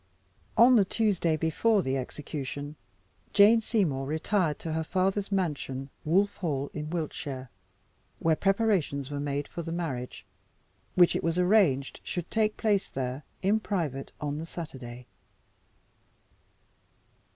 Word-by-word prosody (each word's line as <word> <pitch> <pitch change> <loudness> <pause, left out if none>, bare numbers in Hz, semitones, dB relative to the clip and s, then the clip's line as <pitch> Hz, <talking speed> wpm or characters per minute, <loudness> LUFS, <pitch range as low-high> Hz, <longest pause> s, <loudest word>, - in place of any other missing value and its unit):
On 245 +1 +8
the 205 - +6
Tuesday 190 -5 +1
before 190 +6 +2
the 130 0 0
execution, 145 +2 -5 0.6
Jane 215 +3 +7
Seymour 165 - 0
retired 160 +1 0
to 160 - -4
her 160 0 0
father's 190 +4 0
mansion, 140 -8 -2
Wolff 195 +6 +2
Hall, 145 -6 -2
in 150 0 -4
Wiltshire, 145 -6 -4 0.7
where 160 -1 +2
preparations 195 - +1
were 145 - -3
made 145 0 -2
for 170 - -6
the 165 0 -5
marriage, 145 -8 -4 0.7
which 175 -1 +6
it - - -1
was 165 +1 0
arranged 180 -8 +3
should 175 -2 -4
take 215 -1 +1
place 205 -3 +1
there 130 +1 -4 0.2
in 205 +3 +3
private 160 - -3
on 145 0 -3
the 165 - -6
Saturday. 130 -8 -8
160 Hz, 130 wpm, -28 LUFS, 140-195 Hz, 0.7 s, On